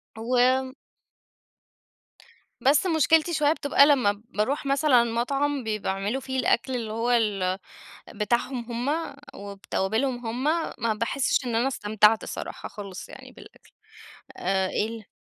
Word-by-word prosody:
و 255 Hz, +3 st, +1 dB, 1.9 s
بس 275 Hz, +6 st, +4 dB
مشكلتي 320 Hz, 0 st, +3 dB
شوية 300 Hz, -1 st, +3 dB
بتبقى 285 Hz, -2 st, +4 dB
لمّا 215 Hz, -8 st, +2 dB
باروح 255 Hz, +8 st, -1 dB
مثلًا 275 Hz, -3 st, +4 dB
مطعم 275 Hz, +4 st, -1 dB
بي 215 Hz, -1 st, -2 dB
بيعملوا 195 Hz, +7 st, -2 dB
فيه 260 Hz, 0 st, -3 dB
الأكْل 255 Hz, 0 st, +1 dB
اللي 225 Hz, -3 st, -4 dB
هو 230 Hz, +2 st, -1 dB
ال 200 Hz, -5 st, +1 dB, 0.6 s
بتاعهم 240 Hz, +3 st, -1 dB, 0.2 s
هُم 315 Hz, -2 st, -2 dB, 0.2 s
وبتوابلهم 220 Hz, +5 st, -2 dB
هُم، 245 Hz, +4 st, -3 dB, 0.3 s
ما 225 Hz, -2 st, 0 dB
باحسش 255 Hz, +4 st, 0 dB
إن 235 Hz, -, -2 dB
أنا 240 Hz, +4 st, +2 dB
استمتعت 215 Hz, -2 st, +3 dB
الصراحة -, -, -6 dB
خالص 200 Hz, -3 st, -9 dB
يعني -, -, -12 dB
بالأكْل، -, -, -17 dB, 0.6 s
آآ 190 Hz, +1 st, 0 dB
ال 220 Hz, 0 st, -3 dB
240 Hz, 120 wpm, -25 LUFS, 210-275 Hz, 1.9 s, بس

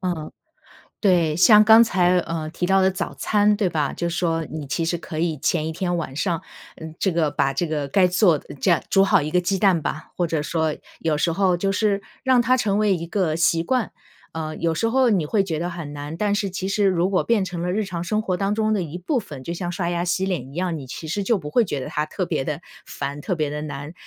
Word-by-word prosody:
嗯， 175 Hz, -4 st, -3 dB, 0.7 s
对， 175 Hz, -6 st, +3 dB
像 210 Hz, +3 st, +7 dB
刚 225 Hz, +1 st, +8 dB
才， 180 Hz, -4 st, +3 dB
呃， 165 Hz, -2 st, -3 dB
提 180 Hz, -, -4 dB
到 190 Hz, +1 st, +3 dB
的 190 Hz, 0 st, +4 dB
早 185 Hz, -, -4 dB
餐， 210 Hz, 0 st, +2 dB
对 200 Hz, -4 st, +1 dB
吧？ 150 Hz, -4 st, -1 dB
就 170 Hz, -, -2 dB
说 165 Hz, -1 st, -1 dB
你 155 Hz, -1 st, -6 dB
其 165 Hz, +5 st, -1 dB
实 175 Hz, +1 st, 0 dB
可 160 Hz, -1 st, -7 dB
以 165 Hz, -2 st, 0 dB
前 155 Hz, +2 st, 0 dB
一 160 Hz, -, -3 dB
天 175 Hz, +1 st, -2 dB
晚 155 Hz, -5 st, -4 dB
上 170 Hz, +2 st, -1 dB, 0.4 s
呃， 160 Hz, 0 st, -9 dB
这 190 Hz, -, +2 dB
个 165 Hz, -3 st, +1 dB
把 135 Hz, -, +1 dB
这 165 Hz, +6 st, -1 dB
个 150 Hz, -3 st, -2 dB
该 185 Hz, +6 st, +4 dB
做 180 Hz, -3 st, +3 dB
的 -, -, -12 dB
这 160 Hz, +6 st, 0 dB
样 170 Hz, -, +4 dB
煮 195 Hz, -, +5 dB
好 -, -, +4 dB
一 155 Hz, -, -3 dB
个 180 Hz, -, +2 dB
鸡 190 Hz, +2 st, -1 dB
蛋 180 Hz, -6 st, +3 dB
吧， 155 Hz, -, -4 dB
或 175 Hz, -, +1 dB
者 160 Hz, -2 st, 0 dB
说 160 Hz, -1 st, -1 dB, 0.2 s
有 155 Hz, -2 st, 0 dB
时 165 Hz, +1 st, +1 dB
候 185 Hz, 0 st, +2 dB
就 195 Hz, +2 st, 0 dB
是 205 Hz, -1 st, +1 dB, 0.2 s
让 260 Hz, -2 st, +4 dB
它 255 Hz, +2 st, +3 dB
成 205 Hz, -4 st, 0 dB
为 210 Hz, -2 st, +3 dB
一 170 Hz, 0 st, -6 dB
个 175 Hz, -5 st, 0 dB
习 165 Hz, 0 st, +2 dB
惯。 250 Hz, +2 st, 0 dB, 0.4 s
呃， 155 Hz, -1 st, -4 dB
有 165 Hz, -1 st, 0 dB
时 225 Hz, -, +1 dB
候 255 Hz, 0 st, +3 dB
你 180 Hz, -7 st, +1 dB
会 200 Hz, +5 st, +2 dB
觉 165 Hz, -5 st, -3 dB
得 175 Hz, +2 st, -2 dB
很 170 Hz, -4 st, -6 dB
难， 145 Hz, +2 st, -6 dB
但 205 Hz, +1 st, 0 dB
是 200 Hz, -2 st, -1 dB
其 190 Hz, +1 st, -4 dB
实 200 Hz, +1 st, +1 dB
如 185 Hz, 0 st, +2 dB
果 185 Hz, -, +1 dB
变 220 Hz, -5 st, +2 dB
成 175 Hz, -2 st, -5 dB
了 180 Hz, 0 st, -1 dB
日 215 Hz, +2 st, 0 dB
常 175 Hz, -2 st, -5 dB
生 215 Hz, +4 st, 0 dB
活 185 Hz, -4 st, -1 dB
当 200 Hz, +2 st, 0 dB
中 215 Hz, 0 st, +1 dB
的 205 Hz, -, +1 dB
一 165 Hz, 0 st, -5 dB
部 245 Hz, -, -1 dB
分， 145 Hz, -, -8 dB
就 170 Hz, -, -5 dB
像 175 Hz, 0 st, -4 dB
刷 175 Hz, -1 st, -2 dB
牙 175 Hz, 0 st, -1 dB
洗 185 Hz, +2 st, 0 dB
脸 175 Hz, -10 st, -2 dB
一 -, -, -13 dB
样， 175 Hz, -2 st, -2 dB
你 135 Hz, -, -9 dB
其 155 Hz, +5 st, -7 dB
实 200 Hz, +4 st, -2 dB
就 230 Hz, +2 st, +2 dB
不 150 Hz, -5 st, -6 dB
会 240 Hz, +8 st, +3 dB
觉 145 Hz, -8 st, -3 dB
得 -, -, -5 dB
它 150 Hz, +1 st, -2 dB
特 185 Hz, +3 st, -3 dB
别 135 Hz, -, -2 dB
地 150 Hz, +3 st, -3 dB, 0.3 s
烦， 140 Hz, +1 st, -5 dB
特 185 Hz, -, -2 dB
别 155 Hz, -3 st, -1 dB
地 150 Hz, 0 st, -4 dB
难， 145 Hz, +1 st, -6 dB
175 Hz, 280 characters per minute, -22 LUFS, 160-195 Hz, 0.7 s, 刚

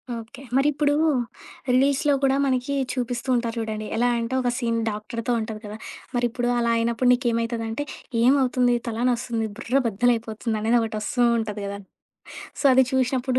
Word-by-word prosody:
Okay. 230 Hz, +3 st, -9 dB, 0.2 s
మరిప్పుడు 290 Hz, +1 st, +2 dB, 0.8 s
రిలీజ్‌లో 280 Hz, +3 st, +3 dB
కూడా 270 Hz, 0 st, +4 dB
మనకి 260 Hz, +1 st, 0 dB, 0.2 s
చూపిస్తూ 245 Hz, 0 st, -3 dB
ఉంటారు 235 Hz, -1 st, -1 dB
చూడండి. 215 Hz, -1 st, -4 dB
ఎలా 245 Hz, +2 st, +2 dB
అంటే 230 Hz, +2 st, -3 dB
ఒక 245 Hz, -, +1 dB
సీన్ 230 Hz, -2 st, 0 dB
డాక్టరుతో 225 Hz, +3 st, -4 dB
ఉంటది 220 Hz, -1 st, -5 dB
కదా! 210 Hz, +1 st, -7 dB, 0.4 s
మరి 245 Hz, 0 st, +2 dB
ఇప్పుడు 240 Hz, +1 st, -2 dB
అలా 235 Hz, 0 st, +1 dB
అయినప్పుడు 235 Hz, +2 st, 0 dB
నీకేమైతదంటే 230 Hz, +1 st, -1 dB, 0.4 s
ఏమవుతుంది? 250 Hz, -2 st, +3 dB
తలానొస్తుంది? 235 Hz, -1 st, -1 dB
బుర్రబద్ధల 245 Hz, -2 st, +1 dB
అయిపోతుంది 225 Hz, 0 st, -4 dB
అనేది 230 Hz, +2 st, +3 dB
ఒకటి 220 Hz, -1 st, -3 dB
వస్తూ 245 Hz, +3 st, 0 dB, 0.2 s
ఉంటది 210 Hz, -2 st, -4 dB
కదా! 200 Hz, 0 st, -5 dB, 0.8 s
సో, -, -, -5 dB
అది 260 Hz, 0 st, +6 dB
చూసినప్పుడు 255 Hz, 0 st, +1 dB
240 Hz, 145 wpm, -24 LUFS, 225-255 Hz, 0.8 s, అది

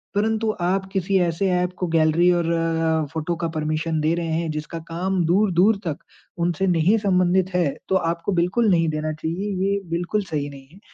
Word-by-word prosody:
परंतु 220 Hz, +1 st, +1 dB
आप 190 Hz, +2 st, 0 dB
किसी 195 Hz, 0 st, +1 dB
ऐसे 175 Hz, +2 st, 0 dB
ऐप 180 Hz, 0 st, 0 dB
को 180 Hz, -, -2 dB
गैलरी 160 Hz, +2 st, +4 dB
और 170 Hz, -1 st, +1 dB
अ, 165 Hz, -1 st, 0 dB
फ़ोटो 165 Hz, +1 st, -2 dB
का 165 Hz, 0 st, -2 dB
परमिशन 155 Hz, +1 st, -1 dB
दे 155 Hz, +2 st, +2 dB
रहे 170 Hz, -1 st, -3 dB
हैं 165 Hz, -, -3 dB
जिसका 155 Hz, +2 st, -5 dB
काम 180 Hz, +2 st, -1 dB
दूर-दूर 190 Hz, +3 st, +3 dB
तक 150 Hz, -, -2 dB, 0.5 s
उनसे 175 Hz, +2 st, 0 dB
नहीं 180 Hz, +5 st, +3 dB
संबंधित 185 Hz, -2 st, +2 dB
है 180 Hz, -1 st, +3 dB, 0.2 s
तो 190 Hz, -, +2 dB
आपको 170 Hz, +2 st, -1 dB
बिल्कुल 185 Hz, +6 st, +2 dB
नहीं 165 Hz, -2 st, +3 dB
देना 155 Hz, 0 st, -2 dB
चाहिए। 165 Hz, +6 st, -3 dB, 0.2 s
ये 200 Hz, 0 st, +1 dB
बिल्कुल 175 Hz, +5 st, -1 dB
सही 145 Hz, -5 st, -3 dB
नहीं 135 Hz, -1 st, -13 dB
है। 190 Hz, -, -16 dB
175 Hz, 185 wpm, -22 LUFS, 160-190 Hz, 0.5 s, गैलरी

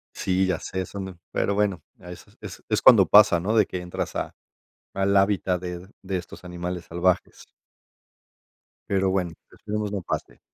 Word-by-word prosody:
Sí, 95 Hz, 0 st, +1 dB
ya 95 Hz, -, 0 dB
sé, 95 Hz, 0 st, -4 dB
son 100 Hz, -1 st, -6 dB
d 95 Hz, -, -8 dB, 0.2 s
pero 100 Hz, -, 0 dB
bueno, 100 Hz, -5 st, 0 dB, 0.2 s
es 90 Hz, 0 st, -10 dB, 0.4 s
es -, -, 0 dB
cuando -, -, +8 dB
pasa, 105 Hz, -4 st, +6 dB
¿no?, 105 Hz, +6 st, -1 dB
de 105 Hz, -, +5 dB
que 90 Hz, -, -5 dB
entras 90 Hz, 0 st, -5 dB
a -, -, -3 dB, 0.6 s
al 100 Hz, +1 st, +1 dB
hábitat 95 Hz, -2 st, +2 dB
de 90 Hz, 0 st, -6 dB
de 95 Hz, -1 st, -3 dB
estos 90 Hz, +1 st, -10 dB
animales 90 Hz, 0 st, -5 dB
salvajes. 90 Hz, +2 st, -1 dB, 1.5 s
Pero 95 Hz, -1 st, +2 dB
bueno, 90 Hz, -3 st, 0 dB, 0.2 s
esperemos 105 Hz, -1 st, -4 dB
no 100 Hz, -, -3 dB
pase. -, -, -5 dB
95 Hz, 160 wpm, -25 LUFS, 90-100 Hz, 1.5 s, cuando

